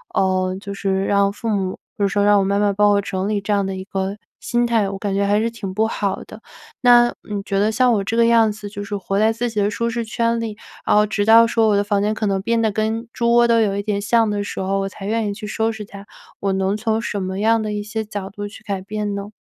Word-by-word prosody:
呃， 185 -1 +1
就 200 0 -7
是 195 -1 -1
让 200 0 +2
父 210 +3 -7
母 190 -3 0 0.2
比 - - -6
如 - - +4
说 200 +1 +1
让 205 0 +5
我 195 - +2
妈 200 +1 +1
妈 205 -1 +2
帮 205 +1 +3
我 200 0 +3
整 190 0 -3
理 210 -1 0
这 205 +1 -1
样 200 -1 +2
的 195 0 -3
一 190 - -6
个 195 0 -3 0.2
心 240 0 0
态， 225 -4 +1
我 195 - -5
感 200 0 -3
觉 200 0 +1
还 205 +1 +2
是 225 +1 0
挺 210 -5 -6
不 220 +3 +1
好 200 -3 -2
的。 - - -12 0.4
那 240 -1 +7 0.2
你 205 -1 -2
觉 195 0 -1
得 210 +2 +2
像 250 +1 +3
我 200 - +1
这 225 +4 -2
个 235 - +5
样 230 -2 +4
子， 210 0 -8
就 205 0 -6
是 205 0 -4
活 195 0 -3
在 220 +1 +4
自 240 +2 -2
己 215 -2 -1
的 200 - +2
舒 235 +3 -1
适 235 0 -2
圈 230 +1 0
里， 220 -2 -5 0.3
然 - - +2
后 210 0 +5
直 205 -1 -1
到 230 +1 +7
说 225 -1 +2
我 205 - +3
的 200 - +2
房 205 -1 0
间 210 +1 +1
可 215 - -3
能 195 -2 0
变 230 +3 0
得 220 - +2
跟 220 +2 -2
猪 235 -1 +1
窝 240 0 +5
都 230 -1 +4
有 200 -2 +1
一 200 - -2
点 205 -1 -1
像 225 +1 +2
的 205 -1 -1
时 - - -6
候， 195 +1 0
我 195 0 -2
才 195 - -10
愿 220 +1 0
意 - - -3
去 210 +1 -8
收 220 +1 0
拾 220 -1 -7
它， 200 0 -11 0.4
我 200 - 0
能 190 +1 0
从 220 +1 0
什 210 -3 -3
么 190 +1 -3
样 225 +2 +3
的 215 -1 -3
一 210 - -2
些 220 +1 -4
角 205 -2 -6
度 205 +1 -7
去 215 +1 -13
改 195 -2 -3
变 205 +1 -3
呢？ 200 0 -5
205 Hz, 310 characters per minute, -20 LUFS, 200-225 Hz, 0.4 s, 那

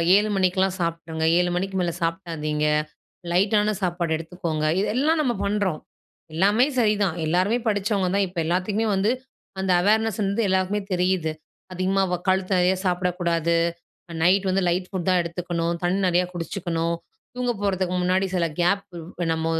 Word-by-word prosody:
7:00 210 +1 +3
மணிக்லாம் 185 0 +2
சாப்டுங்க, 165 -1 -3 0.2
7:00 180 0 +2
மணிக்கு 190 +1 -2
மேல 175 - 0
சாப்டாதீங்க, 165 -4 -2 0.7
லைட்டான 205 +3 +3
சாப்பாடு 175 -3 0
எடுத்துக்கோங்க, 165 -2 -3 0.2
இதெல்லாம் 270 +10 +1
நம்ம 255 -5 +1
பண்றோம். 200 -6 -1 0.5
எல்லாமே 205 +9 +4
சரிதான், 210 -6 +2
எல்லாருமே 185 +8 +2
படிச்சவங்க 205 -2 +1
தான். 200 0 +3
இப்ப 180 0 -14
எல்லாத்துக்குமே 195 +6 0
வந்து 200 +4 +2 0.5
அந்த 190 -1 0
அவேர்னஸ் 220 +2 +2
வந்து 200 +3 0
எல்லாருக்குமே 190 +2 +1
தெரியுது. 180 -3 +1 0.4
அதிகமா 190 +2 +1
வ - - +2
கழுத்து 190 0 +1
நிறைய 180 +1 +3
சாப்டக்கூடாது. 175 -2 0 0.7
நைட் 190 +3 +4
வந்து 190 +1 +1
லைட் 180 +1 -1
ஃபுட் 190 -3 -4
தான் 185 -1 +4
எடுத்துக்கணும், 170 0 -2
தண்ணி 180 +3 +1
நிறையா 180 0 +2
குடிச்சுக்கணும், 170 -1 -2 0.4
தூங்க 250 -1 0
போறதுக்கு 185 -2 0
முன்னாடி 185 +2 +2
சில 175 -2 +2
கேப், 195 +3 +2 0.3
இப்ப 175 - -4
நம்ம 160 0 -2
185 Hz, 145 wpm, -24 LUFS, 170-200 Hz, 0.7 s, எல்லாமே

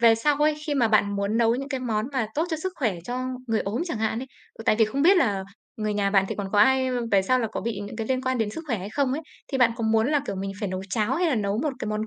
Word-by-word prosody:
về 230 -1 +7
sau 285 +6 +1
ấy, 300 +1 +3
khi 295 - 0
mà 240 -5 +3
bạn 205 -2 +2
muốn 200 +2 0
nấu 230 0 +4
những 275 +3 -4
cái 265 -3 -3
món 225 -2 -1
mà 255 -5 0
tốt 315 - +1
cho 320 - 0
sức 375 +4 -4
khỏe 225 -8 0
cho 245 +4 -3 0.3
người 225 -1 +1
ốm 215 +9 -2
chẳng 330 -11 -4
hạn 220 +1 0
ấy, 265 - -5 0.3
ừ, 225 - -9
tại 215 - +4
vì 220 - +6
không 270 +7 -2
biết 380 +4 +6
là 205 - +1 0.3
người 215 -2 -2
nhà 200 -1 +1
bạn 195 -1 +4
thì - - -2
còn 195 -2 -4
có 205 - +3
ai, 260 +4 +5
ơ, 250 -1 -1
về 195 - +5
sau 255 +7 +2
là 230 - 0
có - - -3
bị 215 -2 -3
những 205 +1 -7
cái 225 -1 -3
liên 260 -1 0
quan 260 -1 0
đến 220 -2 0
sức 325 +9 -7
khỏe 230 -8 -1
hay 195 +3 -6
không 270 0 0
ấy, 295 - -2 0.3
thì 265 - 0
bạn 245 -2 +5
có 230 - -2
muốn 220 +1 +3
là, 295 -1 +3
kiểu, 200 - -3
mình 195 +1 -3
phải 205 - -1
nấu 185 0 -4
cháo 220 +4 +1
hay 355 +4 +1
là 280 - +2
nấu 205 -1 -1
một 295 +2 0
cái 220 - -4
món 215 +1 -2
225 Hz, 335 wpm, -25 LUFS, 210-265 Hz, 0.3 s, về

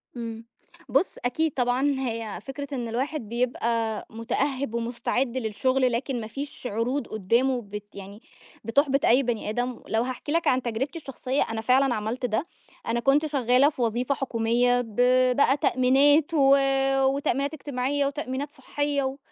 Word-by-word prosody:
امم، 230 -1 -6 0.4
بُص، - - +1
أكيد 315 +5 +1
طبعًا 260 +3 +1
هي 230 -4 -3
فكرة 280 +1 -6
إن 240 -2 -3
الواحد 245 0 -3
بيبقى 230 -2 -1
مُتأهِّب 235 +3 -2
ومُستعد 240 +2 -1
للشغل 255 +3 +1
لكن 245 0 -2
ما 215 - -6
فيش 275 0 -6
عروض 240 +5 -2
قُدّامه 240 +5 +1
بت 205 -1 -9
يعني، 200 +3 -10 0.4
بتحبِط 275 +3 +2
أي 255 +4 +5
بني 230 -3 -2
آدم، 245 +2 -2
لو 220 +1 +1
هاحكي 255 +3 -5
لك 335 +1 +1
عن 255 0 +3
تجربتي 255 +8 -3
الشخصيّة، 270 -1 -3
أنا 225 - -3
فعلًا 255 +2 +3
عملت 225 +4 -3
ده، 225 +7 -1 0.4
أنا 235 +1 0
كُنت 275 +5 +3
شغّالة 270 -1 +3
في 265 - -7
وظيفة 245 +4 0
حكومية 245 0 +1
ب 225 -3 -10 0.4
بقى 280 0 +3
تأمينات 280 +5 +3
و 275 -3 +6 0.5
وتأمينات 275 +1 0
إجتماعيّة 280 -1 -1
وتأمينات 280 0 -3
صحّية 290 0 -2
و 265 +1 -3
250 Hz, 150 wpm, -26 LUFS, 230-275 Hz, 0.5 s, و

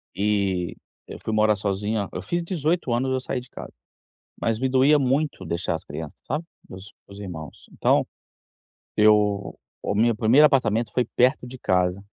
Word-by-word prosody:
E 100 -3 0 0.3
eu - - -9
fui 110 - -2
morar 110 0 +3
sozinho, 100 +1 -2
eu 90 - -4
fiz 175 - -2
18 170 -4 -1
anos 130 +2 0
eu 130 - +1
saí 130 0 -3
de 125 - -16
casa, - - -9 0.7
mas 115 -1 0
me 130 - +1
doía 135 +3 +5
muito 135 -5 0
deixar 85 +2 -2
as - - -7
crianças, - - -8
sabe. 155 +4 -2 0.2
Meus 95 +2 -11 0.3
irmãos. 85 -7 -8
Então, - - +2 0.9
eu 105 -1 +3 0.2
o - - -2
meu 115 +2 +3
1º 120 +7 +5
apartamento 115 -6 +2
foi 125 - +1
perto 125 0 +2
de 130 +1 -9
casa. 90 -2 0
110 Hz, 165 wpm, -24 LUFS, 100-130 Hz, 0.9 s, doía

